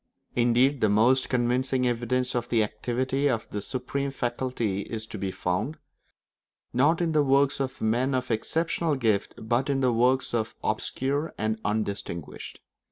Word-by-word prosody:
Indeed 125 +3 +3
the 110 - +4
most 120 +6 +3
convincing 125 +1 +1
evidence 125 +1 0
of 120 0 -2
the 115 -2 +3
activity 130 +6 -1
of 115 -4 -1
this 105 -1 -3
supreme 140 +2 -2
faculty 120 -5 -2
is 110 +2 -5
to 110 - -8
be 95 - -2
found, 105 - -2 1.0
not 145 +7 +3
in 170 -1 +1
the 155 -1 +3
works 140 0 +3
of 135 -1 -3
men 125 +5 +1
of 125 -1 -2
exceptional 160 +6 0
gift, 110 -6 0
but 120 +5 0
in 135 -1 +1
the 125 -2 +3
work 125 +3 +3
of 110 -2 -1
the - - -2
obscure 140 +4 -1
and 110 +1 -1
undistinguished. 100 -6 -4
125 Hz, 160 wpm, -27 LUFS, 110-135 Hz, 1.0 s, the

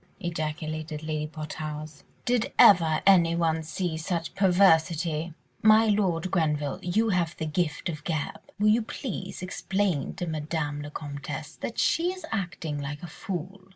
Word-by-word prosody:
ejaculated 155 -2 -4
Lady 155 -1 -2
Portarles, 155 -1 -6 0.2
"did 245 -2 +1
ever 165 -5 +6
anyone 170 -4 +4
see 160 +2 -3
such 165 +1 -3
perversity? 170 -4 +3 0.3
My 220 +1 +6
Lord 185 -4 +1
Grenville, 150 -5 0
you 215 +6 +1
have 175 -4 0
the 160 - -2
gift 155 -1 -1
of 165 -3 -3
the - - -17
gab, 155 -4 -2 0.2
will 210 +1 +3
you 225 +3 +4
please 205 -5 -5
explain 190 -3 -1
to 180 -1 -3
Madame 155 -2 -2
la 145 - -6
Comtesse 145 0 -6
that 235 - -5
she 345 +2 +2
is 370 0 -8
acting 170 -7 -3
like 145 +2 -5
a - - -5
fool. 185 +3 -6
165 Hz, 150 wpm, -27 LUFS, 155-190 Hz, 0.3 s, ever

